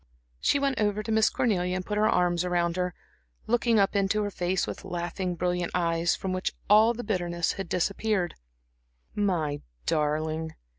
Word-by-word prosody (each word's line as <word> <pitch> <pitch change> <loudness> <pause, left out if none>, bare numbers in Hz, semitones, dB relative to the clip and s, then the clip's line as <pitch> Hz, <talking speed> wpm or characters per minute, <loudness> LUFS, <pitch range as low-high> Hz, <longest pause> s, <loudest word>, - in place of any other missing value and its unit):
She - - +3
went 275 -3 0
over 210 0 +1
to 220 - -4
Miss 220 0 +4
Cornelia 180 -6 0
and 185 -1 -3
put 210 0 -1
her 215 - +4
arms 175 -1 +2
around 175 -1 0
her, 180 -1 -2 0.5
looking 235 0 +2
up 200 0 +3
into 200 +2 +2
her 205 - -2
face 180 0 0
with - - -6
laughing, 180 0 -3
brilliant 180 0 -1
eyes, 170 -1 +1
from 190 -1 -3
which 185 0 -2
all 220 +3 +6
bitterness 175 -7 -1
had 195 -3 -6
disappeared. 195 +1 0 0.8
"My 170 -8 0 0.2
darling." 155 +1 -1
185 Hz, 160 wpm, -27 LUFS, 175-210 Hz, 0.8 s, all